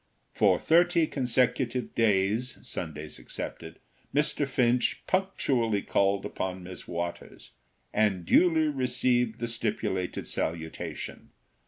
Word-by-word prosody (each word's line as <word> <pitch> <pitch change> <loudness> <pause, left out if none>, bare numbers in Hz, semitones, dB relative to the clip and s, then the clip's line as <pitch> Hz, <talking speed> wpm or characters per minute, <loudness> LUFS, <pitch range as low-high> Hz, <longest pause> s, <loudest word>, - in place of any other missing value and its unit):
For - - +4
thirty 170 0 +4
consecutive 125 -2 0
days, 110 +3 +1
Sundays 75 -1 -6
excepted, 80 -1 -7 0.4
Mr. 150 -1 +2
Finch 125 -2 +1
punctually 130 - +1
called 100 0 +1
upon 95 -1 -4
Miss 90 +1 -9
Waters, 85 0 -5 0.4
and 100 -5 +1
duly 160 - +4
received 125 -4 +1
the 120 - -3
stipulated 105 -5 -2
salutation. 80 0 -4
115 Hz, 100 wpm, -28 LUFS, 95-135 Hz, 0.4 s, For